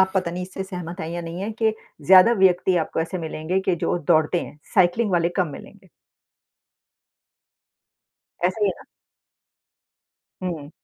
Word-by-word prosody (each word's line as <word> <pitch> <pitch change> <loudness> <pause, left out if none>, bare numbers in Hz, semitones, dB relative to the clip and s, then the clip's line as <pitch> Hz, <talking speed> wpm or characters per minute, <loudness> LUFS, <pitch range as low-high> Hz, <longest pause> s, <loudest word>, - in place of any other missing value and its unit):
आप 190 0 +3
पता 185 -3 0
नहीं 180 +2 -4
इससे 190 +1 -6
सहमत 180 -1 -7
हैं 160 - -4
या 175 0 -4
नहीं 170 +1 -6
हैं 215 +3 -3
कि 220 0 0 0.3
ज़्यादा 190 +5 +8
व्यक्ति 180 0 +3
आपको 160 -1 -1
ऐसे 165 +3 -3
मिलेंगे 160 +2 -2
कि 190 -2 0
जो 175 - -1
दौड़ते 160 +1 +2
हैं, - - -9 0.2
साइकिलिंग 190 +4 +3
वाले 170 -1 +2
कम 185 - +2
मिलेंगे। - - -13 2.6
ऐसे 185 +5 0
ही - - +3
है - - 0
ना? - - -15 1.6
हुँ। 160 -5 -5
180 Hz, 155 wpm, -23 LUFS, 170-190 Hz, 2.6 s, ज़्यादा